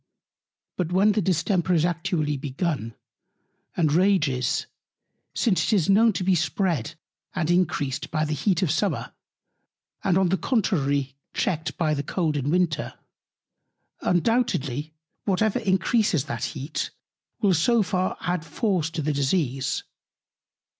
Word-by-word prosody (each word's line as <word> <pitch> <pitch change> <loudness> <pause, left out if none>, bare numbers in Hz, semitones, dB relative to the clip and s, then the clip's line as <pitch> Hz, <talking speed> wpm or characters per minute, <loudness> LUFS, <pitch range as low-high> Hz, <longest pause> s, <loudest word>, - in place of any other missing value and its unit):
But 180 -2 -1
when 195 +4 +4
the 210 - +1
Distemper 180 0 +1
is 160 0 +3
actually 165 -3 -1
begun, 140 - -3 0.8
and 155 -4 +2
rages, 155 -9 +2 0.7
since 190 -9 +2
it - - +1
is 190 -1 +3
known 225 +3 +5
to 185 - -2
be 190 +1 +3
spread 160 - 0 0.4
and 160 +1 0
increased 155 -7 0
by 155 -1 0
the 150 - -2
Heat 185 +5 +1
of 175 - +1
the - - +2
Summer, 200 +5 -1 0.9
and 185 -2 +3
on 190 -2 +3
the 190 - +2
contrary 145 - 0 0.2
checked 160 -3 -1
by 155 -3 +1
the 140 - -1
cold 155 +1 -1
in 140 0 -1
Winter; 165 -3 0 1.1
undoubtedly, 160 - 0 0.3
whatever 215 +4 +1
increases 195 - +2
that 140 - -3
Heat 140 +3 -3 0.5
will 200 -4 +3
so 220 +8 +3
far 185 -1 -1
add 175 -2 -1
Force 165 0 -1
to 160 -2 -4
the 150 +1 0
Disease. 135 -2 0
170 Hz, 135 wpm, -25 LUFS, 150-190 Hz, 1.1 s, known